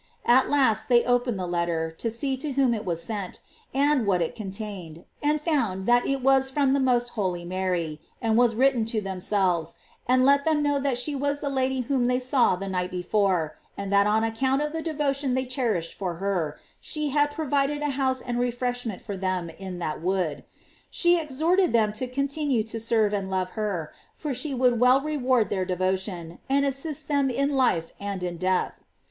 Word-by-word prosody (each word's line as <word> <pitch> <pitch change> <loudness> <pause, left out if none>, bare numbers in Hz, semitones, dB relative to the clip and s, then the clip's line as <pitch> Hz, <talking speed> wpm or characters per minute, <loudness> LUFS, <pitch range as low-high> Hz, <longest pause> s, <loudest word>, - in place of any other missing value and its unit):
At 255 +2 +5
last 230 -6 +2
they 240 -1 +5
opened 245 -2 +1
the 185 - -3
letter, 170 -2 -1
to 195 +8 -3
see 265 +4 -2
to 285 +1 -4
whom 260 -2 +3
it 215 -1 -4
was 170 -2 -2
sent, 205 -5 -5 0.3
and 275 -4 +2
what 185 -3 +3
it 165 - -1
contained, 195 -6 -7 0.2
and 300 +1 +2
found 235 - 0
that 240 +1 +3
it 275 -2 -1
was 265 0 +4
from 270 -1 +2
the 280 - +2
most 245 -2 +2
holy 185 -7 -2
Mary, 175 -4 -2 0.2
and 225 -1 +1
was 235 -1 +4
written 255 -1 +3
to 225 0 -1
themselves, 185 -3 -1 0.3
and 255 +1 +4
let 280 +1 +5
them 310 -1 +2
know 290 -1 +1
that 275 -3 0
she 270 +5 +1
was 285 +1 -1
the 285 -1 -3
Lady 265 -1 0
whom 250 0 0
they 250 0 +2
saw 255 -5 +2
the 195 +2 -6
night 180 -1 -2
before, 180 -3 0 0.2
and 200 0 -3
that 200 +1 +5
on 215 +1 +2
account 260 +4 +1
of 300 - -2
the 325 - -2
devotion 285 -4 0
they 260 0 0
cherished 235 -10 -1
for 180 -3 -4
her, 175 -5 -2 0.2
she 305 -2 -2
had 290 +1 +2
provided 290 -1 -1
a 295 - 0
house 260 -1 0
and 240 -1 -2
refreshment 245 -3 -2
for 205 - -5
them 185 -3 -2
in 185 +1 -7
that 155 -3 -4
wood. 175 -5 -1 0.5
She 345 -1 +3
exhorted 320 +5 +1
them 215 -2 +3
to 250 +4 -3
continue 275 -1 0
to 225 +1 -6
serve 220 -2 +2
and 195 -2 -2
love 185 -1 -1
her, 195 -8 -3 0.2
for 300 -3 -4
she 270 +4 -2
would 250 -2 +2
well 250 +2 +6
reward 260 -6 +1
their 190 -2 0
devotion, 185 -2 -2
and 280 +1 +3
assist 280 +2 -3
them 280 -2 +2
in 280 +3 0
life 170 -11 +1
and 200 -2 -4
in 175 -1 -3
death. 185 +1 0
240 Hz, 195 wpm, -26 LUFS, 190-275 Hz, 0.5 s, well